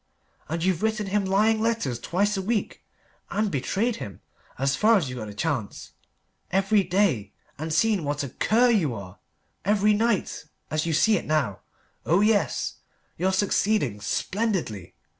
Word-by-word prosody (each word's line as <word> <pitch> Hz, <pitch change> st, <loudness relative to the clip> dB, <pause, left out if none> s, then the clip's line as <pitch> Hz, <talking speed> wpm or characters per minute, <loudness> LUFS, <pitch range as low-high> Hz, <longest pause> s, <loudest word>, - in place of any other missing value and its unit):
And 165 Hz, +1 st, -2 dB
you've 180 Hz, -2 st, +1 dB
written 220 Hz, -1 st, 0 dB
him 195 Hz, +1 st, 0 dB
lying 215 Hz, +3 st, +2 dB
letters 220 Hz, -, 0 dB
twice 200 Hz, -, 0 dB
a 195 Hz, -, -1 dB
week, 210 Hz, +2 st, -2 dB, 0.5 s
and 210 Hz, -1 st, 0 dB
betrayed 200 Hz, -, -1 dB
him, 100 Hz, -3 st, -8 dB, 0.4 s
as 135 Hz, +1 st, +1 dB
far 220 Hz, +1 st, +5 dB
as 165 Hz, -8 st, -1 dB
you -, -, -6 dB
got 110 Hz, -3 st, -5 dB
the 105 Hz, -, -8 dB
chance, 125 Hz, -4 st, -3 dB, 0.6 s
every 195 Hz, +3 st, +3 dB
day, 175 Hz, -, 0 dB, 0.3 s
and 160 Hz, +1 st, -4 dB
seen 200 Hz, +3 st, +2 dB
what 145 Hz, 0 st, -2 dB
a 140 Hz, -, -4 dB
cur 235 Hz, -, +3 dB
you 160 Hz, -, +1 dB
are, 95 Hz, -3 st, -9 dB, 0.4 s
every 210 Hz, +1 st, +3 dB
night, 225 Hz, 0 st, 0 dB, 0.3 s
as 155 Hz, +1 st, 0 dB
you 165 Hz, -, 0 dB
see 210 Hz, +8 st, +4 dB
it -, -, -5 dB
now. 145 Hz, -11 st, 0 dB, 0.4 s
Oh, 175 Hz, +5 st, +3 dB
yes 210 Hz, -1 st, +1 dB, 0.4 s
you're 190 Hz, +2 st, +1 dB
succeeding 190 Hz, -, +1 dB
splendidly. 175 Hz, -, -2 dB
190 Hz, 160 wpm, -25 LUFS, 145-215 Hz, 0.6 s, far